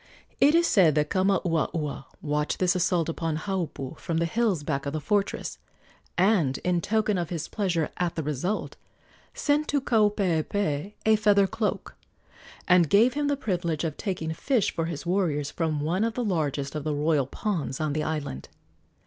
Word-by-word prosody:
It 295 Hz, +3 st, +5 dB
is 340 Hz, 0 st, +4 dB
said 175 Hz, -, +4 dB
that 150 Hz, 0 st, +1 dB
Kamauaua 170 Hz, -6 st, 0 dB, 0.2 s
watched 150 Hz, 0 st, -1 dB
this 185 Hz, 0 st, +2 dB
assault 175 Hz, -2 st, +1 dB
upon 165 Hz, -1 st, -2 dB
Haupu 165 Hz, -6 st, -4 dB
from 165 Hz, -, -2 dB
the 170 Hz, -, +2 dB
hills 195 Hz, -3 st, 0 dB
back 140 Hz, -2 st, -2 dB
of 140 Hz, -, -3 dB
the 155 Hz, -, -1 dB
fortress, 200 Hz, +5 st, -1 dB, 0.6 s
and, 180 Hz, -8 st, +3 dB
in 180 Hz, -1 st, +1 dB
token 215 Hz, -2 st, +1 dB
of 170 Hz, -2 st, -3 dB
his 165 Hz, -3 st, -4 dB
pleasure 180 Hz, -6 st, -1 dB
at 175 Hz, -2 st, -1 dB
the 160 Hz, -, -2 dB
result, 150 Hz, +8 st, -2 dB, 0.6 s
sent 295 Hz, +1 st, +1 dB
to 285 Hz, -, +1 dB
Kaupeepee 200 Hz, -, 0 dB
a 220 Hz, 0 st, +6 dB
feather 205 Hz, -2 st, +4 dB
cloak, 220 Hz, +2 st, -3 dB, 0.7 s
and 180 Hz, -4 st, +5 dB
gave 230 Hz, -, +5 dB
him 290 Hz, +1 st, -1 dB
the 285 Hz, -1 st, +1 dB
privilege 175 Hz, -, -2 dB
of 160 Hz, -3 st, -2 dB
taking 175 Hz, -6 st, -3 dB
fish 230 Hz, -, +1 dB
for 165 Hz, -, -1 dB
his 165 Hz, -2 st, -5 dB
warriors 165 Hz, -6 st, 0 dB
from 155 Hz, -3 st, -1 dB
one 175 Hz, +7 st, 0 dB
of 230 Hz, -1 st, -1 dB
the 245 Hz, -, -1 dB
largest 145 Hz, -7 st, -1 dB
of 150 Hz, -2 st, -4 dB
the 150 Hz, -1 st, -1 dB
royal 145 Hz, -2 st, +1 dB
ponds 160 Hz, -5 st, -3 dB
on 155 Hz, -2 st, -1 dB
the 155 Hz, -, -1 dB
island. 150 Hz, -, -4 dB
170 Hz, 175 wpm, -26 LUFS, 155-205 Hz, 0.7 s, a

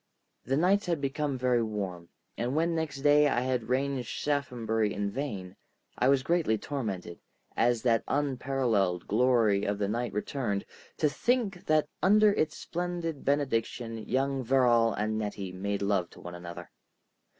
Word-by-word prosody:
The 135 Hz, +3 st, +1 dB
nights 190 Hz, +5 st, +3 dB
had 170 Hz, -3 st, 0 dB
become 140 Hz, 0 st, -1 dB
very 125 Hz, -1 st, +2 dB
warm, 95 Hz, -6 st, -4 dB, 0.3 s
and 125 Hz, +4 st, -2 dB
when 165 Hz, +2 st, +2 dB
next 155 Hz, -4 st, -3 dB
day 145 Hz, +1 st, +5 dB
I 120 Hz, -4 st, +1 dB
had 125 Hz, -3 st, -1 dB
ranged 130 Hz, -1 st, 0 dB
Shaphambury 115 Hz, -7 st, -1 dB
in 100 Hz, 0 st, -2 dB
vain, 100 Hz, -9 st, -5 dB, 0.4 s
I 125 Hz, -, +2 dB
was 135 Hz, -1 st, +3 dB
greatly 165 Hz, -9 st, +2 dB
tormented, 100 Hz, -, -4 dB, 0.4 s
as 120 Hz, 0 st, +2 dB
that 115 Hz, -2 st, +3 dB
unparalleled 125 Hz, -10 st, 0 dB
glory 115 Hz, -3 st, +3 dB
of 100 Hz, 0 st, -1 dB
the 100 Hz, -1 st, -1 dB
night 120 Hz, +3 st, -2 dB
returned, 105 Hz, -1 st, -2 dB, 0.3 s
to 155 Hz, -, +3 dB
think 200 Hz, -, -1 dB
that 155 Hz, -1 st, +3 dB
under 210 Hz, +2 st, +5 dB
its 155 Hz, -4 st, 0 dB
splendid 175 Hz, -3 st, -4 dB
benediction 120 Hz, -4 st, -1 dB
young 135 Hz, 0 st, 0 dB
Verrall 120 Hz, -2 st, +4 dB
and 110 Hz, +1 st, -1 dB
Nettie 100 Hz, -3 st, -4 dB
made 100 Hz, +2 st, -3 dB
love 100 Hz, -4 st, +1 dB
to -, -, -15 dB
one 85 Hz, -, -8 dB
another. 85 Hz, 0 st, -8 dB
125 Hz, 150 wpm, -29 LUFS, 105-145 Hz, 0.4 s, day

